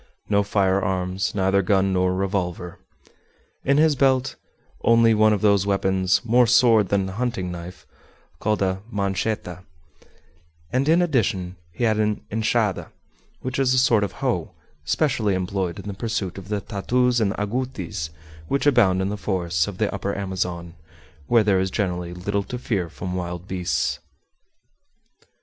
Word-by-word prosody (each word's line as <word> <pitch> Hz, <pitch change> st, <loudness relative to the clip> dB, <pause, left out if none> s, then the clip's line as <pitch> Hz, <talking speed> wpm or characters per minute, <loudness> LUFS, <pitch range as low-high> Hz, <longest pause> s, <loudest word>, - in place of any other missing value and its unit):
No 100 Hz, -1 st, +3 dB
firearms 95 Hz, -2 st, 0 dB
neither 95 Hz, 0 st, +2 dB
gun 95 Hz, +1 st, +2 dB
nor 90 Hz, 0 st, +1 dB
revolver. 90 Hz, -3 st, -3 dB, 0.8 s
In 140 Hz, +1 st, +2 dB
his 155 Hz, -1 st, +4 dB
belt 135 Hz, -1 st, +2 dB, 0.5 s
only 115 Hz, -1 st, +5 dB
one 110 Hz, 0 st, +4 dB
of 105 Hz, -2 st, 0 dB
those 100 Hz, -2 st, +3 dB
weapons, 95 Hz, +1 st, +1 dB
more 120 Hz, +1 st, +4 dB
sword 115 Hz, -4 st, +4 dB
than 100 Hz, -1 st, +1 dB
hunting 95 Hz, -3 st, -3 dB
knife, 90 Hz, +1 st, -9 dB, 0.5 s
called 105 Hz, -1 st, 0 dB
a 95 Hz, 0 st, -1 dB
"manchetta," 100 Hz, -2 st, -2 dB, 1.1 s
and 135 Hz, +4 st, +1 dB
in 170 Hz, +2 st, +5 dB
addition 100 Hz, -, 0 dB, 0.2 s
he 90 Hz, -, -5 dB
had 110 Hz, -2 st, +2 dB
an 105 Hz, -1 st, -1 dB
"enchada," 110 Hz, -2 st, 0 dB, 0.5 s
which 130 Hz, +1 st, -3 dB
is 130 Hz, -1 st, +3 dB
a -, -, +1 dB
sort 120 Hz, -4 st, +4 dB
of 100 Hz, -, -3 dB
hoe, -, -, -2 dB, 0.3 s
specially 115 Hz, -10 st, +1 dB
employed 95 Hz, -1 st, -2 dB
in -, -, -9 dB
the 100 Hz, -, -4 dB
pursuit 100 Hz, -3 st, -3 dB
of 95 Hz, -, -12 dB
the 105 Hz, -1 st, -1 dB
tatous 120 Hz, +5 st, 0 dB
and 100 Hz, -2 st, +1 dB
agoutis 105 Hz, -8 st, -3 dB, 0.4 s
which 140 Hz, -, 0 dB
abound 100 Hz, -10 st, +4 dB
in 95 Hz, -, -1 dB
the 105 Hz, -, -3 dB
forests 90 Hz, -5 st, -1 dB
of 100 Hz, -3 st, -6 dB
the 105 Hz, 0 st, 0 dB
Upper 100 Hz, 0 st, -3 dB
Amazon, 90 Hz, -3 st, -3 dB, 0.5 s
where 115 Hz, +4 st, +4 dB
there 100 Hz, -3 st, +3 dB
is 95 Hz, 0 st, 0 dB
generally 90 Hz, -3 st, -2 dB
little 100 Hz, +3 st, -2 dB
to 110 Hz, +5 st, -6 dB
fear 100 Hz, -8 st, -2 dB
from 90 Hz, +3 st, -6 dB
wild 90 Hz, 0 st, -5 dB
beasts. 90 Hz, -2 st, -1 dB
100 Hz, 150 wpm, -23 LUFS, 95-115 Hz, 1.1 s, only